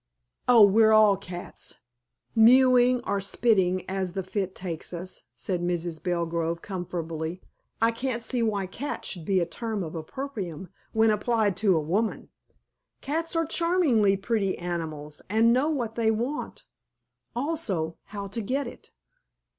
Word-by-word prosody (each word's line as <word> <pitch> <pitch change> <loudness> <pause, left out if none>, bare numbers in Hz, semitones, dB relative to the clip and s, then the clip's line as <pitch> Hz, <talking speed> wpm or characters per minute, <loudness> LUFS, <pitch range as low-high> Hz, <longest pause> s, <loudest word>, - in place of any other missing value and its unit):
"Oh, 235 -3 +8
we're 220 +2 +5
all 215 -2 +6
cats, 180 -2 -7 0.6
mewing 250 +1 +6
or 200 - 0
spitting 190 -3 +1
as 190 -2 -2
the 190 0 -2
fit 190 0 -3
takes 175 -2 -6
us," 180 +2 -6
said 175 +8 -2
Mrs. 175 -2 -2
Belgrove 170 -1 -1
comfortably. 170 -3 -4 0.4
"I 225 +1 +4
can't 235 0 -3
see 240 +1 -1
why 210 -4 0
cat 280 +10 -5
should 170 -5 -4
be 190 +1 +2
a 170 - +1
term 220 0 -4
of 160 - -6
opprobrium 185 - -6 0.2
when 220 0 +4
applied 210 -2 +1
to 195 -5 +3
a - - +3
woman. 195 +9 -1 0.7
Cats 325 +4 -2
are 330 0 +2
charmingly 295 - +3
pretty 200 -1 0
animals, 160 -4 -5
and 225 +3 +4
know 265 +5 +2
what 245 -8 -2
they 225 -1 +1
want, 240 +7 -3 0.7
also 235 - -2
how 200 -2 -6
to 200 +4 -4
get 265 +7 -1
it. - - -10
200 Hz, 145 wpm, -27 LUFS, 175-235 Hz, 0.7 s, Oh